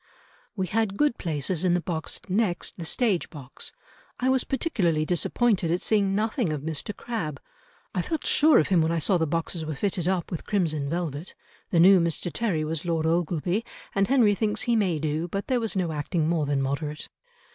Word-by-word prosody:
"We 190 -3 -1
had 200 +1 -1
good 295 -5 +2
places 160 +1 -1
in 180 -1 +3
the - - +2
box 165 -3 -3
next 190 -2 0
the 170 - -5
stage 205 -1 +1
box.... 135 -5 -6 0.5
I 255 - +1
was 260 -1 +3
particularly 190 - 0
disappointed 180 +2 +1
at 175 +2 +1
seeing 200 -3 +2
nothing 220 - 0
of 150 -2 -4
Mr. 160 +5 -3
Crabbe. 160 - -4 0.5
I 180 - 0
felt 315 - -3
sure 310 0 +5
of 155 - +2
him 180 -4 +4
when 160 +1 +1
I 170 - 0
saw 175 +3 +2
the 160 - +1
boxes 165 +1 -2
were 155 -1 -4
fitted 180 +1 -1
up 185 -2 -1
with 170 - -4
crimson 155 -8 0
velvet. 165 -1 -4 0.3
The 170 - +2
new 190 +2 +7
Mr. 170 0 -1
Terry 190 -10 0
was 155 0 -2
Lord 165 -2 -1
Ogleby, 175 +4 0 0.3
and 195 0 +2
Henry 240 -6 +4
thinks 210 +1 0
he 235 - +2
may 190 -7 +1
do, 155 +2 -2
but 195 +3 -3
there 255 -2 +1
was 225 -5 -2
no 180 -4 0
acting 155 +2 -1
more 160 -3 +1
than 140 -1 +1
moderate." 150 +2 -3
175 Hz, 200 wpm, -26 LUFS, 160-205 Hz, 0.5 s, new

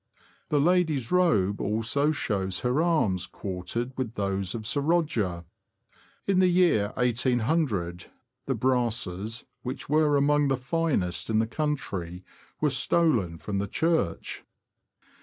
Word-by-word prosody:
The 150 - +2
lady's 160 -6 +2
robe 155 - +2
also 115 +8 +1
shows 95 -10 -1
her 125 +5 +1
arms 110 - +1
quartered 110 +7 -4
with 120 -2 -3
those 100 -1 -2
of 110 -2 -5
Sir 145 +6 +1
Roger. 140 - 0 0.8
In 195 -2 +2
the 185 - +5
year 175 - +3
1800, 120 - 0 0.4
the 135 - 0
brasses, 115 -4 -1 0.2
which 130 +2 -6
were 150 -1 +3
among 145 +1 +3
the 135 -1 +1
finest 130 - -1
in 110 - +2
the 110 - +3
country, 100 - -3 0.4
were 150 -2 +2
stolen 125 - +1
from 100 +3 -3
the 100 - -2
church. 160 - -1
125 Hz, 125 wpm, -27 LUFS, 100-150 Hz, 0.8 s, the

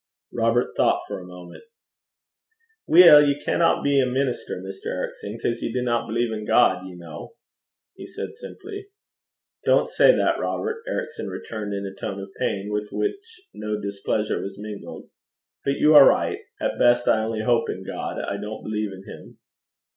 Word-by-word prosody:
Robert 115 +1 +1
thought - - +2
for - - -5
a 90 - -11
moment. 90 - -12 1.2
'Weel, 165 -3 +9
ye 145 -1 +1
canna 165 +3 +1
be 140 -1 +3
a 130 - +1
minister, 125 -5 -2
Mr. 95 +1 -8
Ericson, 105 +3 -5
'cause 115 - -2
ye - - -2
dinna 120 -1 0
believe 115 +1 -1
in 105 -1 -4
God, 105 -4 +3
ye 90 -1 -10
ken,' 85 -2 -9 0.7
he - - -10
said - - -7
simply. 400 0 -9 0.8
'Don't - - +3
say - - +6
that, - - +1
Robert,' 450 +1 -3
Ericson - - -4
returned, 105 -2 -5
in 100 0 -4
a 95 - -6
tone 100 0 -5
of 100 0 -8
pain 100 +1 -2
with 105 0 -2
which 370 -3 -4
no 105 0 -4
displeasure 100 +1 -2
was 95 0 -7
mingled. 105 -1 -8 0.6
'But 140 0 0
you 150 +2 +4
are 145 -2 +10
right. - - 0 0.2
At - - -2
best 120 0 +4
I 110 - +4
only 110 0 -2
hope 120 +1 +2
in - - -5
God; - - -5
I 100 - -3
don't 105 +2 -7
believe 105 -1 -3
in 95 0 -10
him.' - - -12
110 Hz, 170 wpm, -24 LUFS, 100-140 Hz, 1.2 s, are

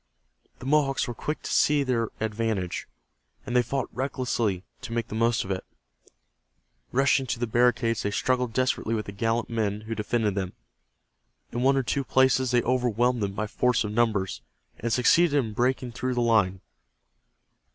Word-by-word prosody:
The 125 - -11
Mohawks 140 -1 +2
were 120 - -3
quick 150 +6 -4
to - - -3
see 145 -1 +4
their 120 -4 0
advantage, 110 -4 -2 0.6
and 120 - -4
they 125 - +6
fought 130 +2 -2
recklessly 120 -7 -1 0.2
to 125 -3 -6
make 115 -1 -2
the - - -7
most 115 +1 +2
of 95 - -5
it. 95 - -2 1.3
Rushing 135 0 +2
to 120 - -1
the 120 - -1
barricades 120 0 +2
they 105 - -1
struggled 125 +3 0
desperately 120 -2 0
with 105 - -3
the - - -6
gallant 115 +3 -1
men 105 -2 -1
who 110 +1 -5
defended 110 -1 0
them. 95 -2 -3 1.0
In 120 - -2
one 135 +2 +4
or 135 - +2
two 140 +3 -1
places 130 0 +3
they 120 0 +2
overwhelmed 125 -1 +1
them 100 -1 -1
by 110 +2 -2
force 120 +3 +1
of 105 - -4
numbers, 105 -4 0 0.4
and 115 - -2
succeeded 145 +7 +4
in 115 -6 0
breaking 125 +2 0
through 125 +2 -2
the 120 - +1
line. 105 -6 +2
120 Hz, 170 wpm, -26 LUFS, 110-130 Hz, 1.3 s, they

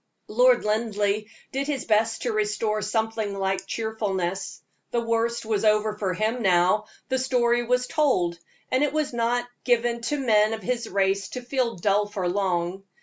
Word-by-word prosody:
Lord - - +4
Linleigh 210 -1 0 0.3
did 275 +1 -2
his 285 -4 -2
best 220 0 +1
to 245 - 0
restore 215 0 0
something 220 -2 -1
like 195 0 -1
cheerfulness. 195 -5 -3 0.3
The 240 - 0
worst 230 0 0
was 215 -2 0
over 215 0 +3
for 195 -3 -2
him 220 +5 -1
now; 185 +1 +3 0.2
the 260 0 +1
story 240 -2 +2
was 250 +1 +1
told, 185 - +1 0.3
and 260 +3 +3
it 295 -1 0
was 305 -4 -1
not 240 +1 0 0.2
given 240 -1 +1
to 295 - 0
men 220 -5 +3
of 220 -2 -5
his 235 +2 -2
race 195 0 +1
to 250 - -5
feel 245 -2 -1
dull 205 +3 +1
for 195 -3 -3
long. 180 -1 -1
220 Hz, 165 wpm, -25 LUFS, 200-240 Hz, 0.3 s, Lord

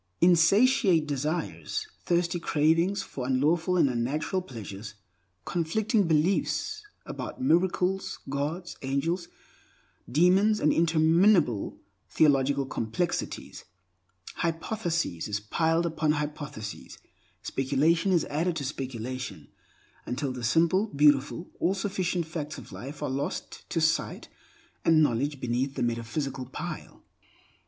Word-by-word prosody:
Insatiate 180 +1 +5
desires; 155 - -2 0.2
thirsty 175 0 +1
cravings 165 +6 +2
for 125 -2 -6
unlawful 160 +7 +2
and 170 - +5
unnatural 135 +9 -1
pleasures; 105 - -8 0.5
conflicting 205 +5 +1
beliefs 190 - +1 0.2
about - - -6
miracles, 185 -3 +1
gods, 150 +6 -3
angels, 160 +7 -1 0.8
demons, 190 - +4
and 150 - +3
interminable 165 - +3 0.3
theological 140 -2 +3
complexities, 135 +8 -3 0.7
hypothesis 170 - -2
is 100 -1 -2
piled 165 +10 +1
upon 155 -2 +1
hypothesis, 145 -8 -5 0.5
speculation 155 +8 +1
is 170 -4 +3
added 165 +4 -1
to 145 - -3
speculation, 130 - -5 0.6
until 130 +2 -2
the 125 -1 -6
simple, 170 - +3
beautiful, 145 +1 +2
all 190 - +2
sufficient 190 -3 -1
facts 155 -2 -5
of - - -11
life 140 +4 -7
are - - -1
lost 140 +2 -4
to 165 - 0
sight 160 0 0 0.5
and 160 -1 +5
knowledge 140 +2 0
beneath 125 +3 -1
the - - -1
metaphysical 125 +3 -3
pile. 130 - -7
155 Hz, 105 wpm, -28 LUFS, 135-175 Hz, 0.8 s, Insatiate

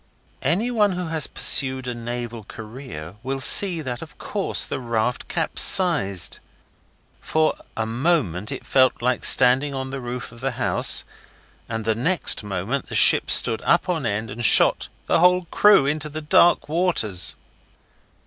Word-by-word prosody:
Anyone 210 - 0
who 180 -2 -6
has 160 -3 -2
pursued 130 -2 +1
a 125 - -4
naval 120 -1 -7
career 105 - -11
will 135 +2 -5
see 170 +5 +5
that 125 -4 -7
of - - -13
course - - 0
the - - -6
raft 120 0 -3
capsized. 100 - +1 0.8
For 155 0 -1 0.2
a 110 - -2
moment 115 - -2
it - - -8
felt 130 -2 +1
like 125 0 -1
standing 135 +3 +4
on 130 0 -6
the 135 - -6
roof 125 -1 -8
of 115 - -16
the 135 -1 -3
house, - - +1 0.7
and 115 -1 -6
the 110 - 0
next 155 +3 +1
moment 105 +7 -5
the - - -7
ship - - +5
stood 115 - +2
up 175 +2 0
on 160 -8 -2
end 110 +1 -4
and 120 +3 -7
shot 105 - +4 0.2
the - - 0
whole 180 +1 +2
crew 205 -8 +4
into 150 +2 -2
the 155 +1 -8
dark 170 +3 +2
waters. 150 - 0
130 Hz, 155 wpm, -21 LUFS, 115-160 Hz, 0.8 s, see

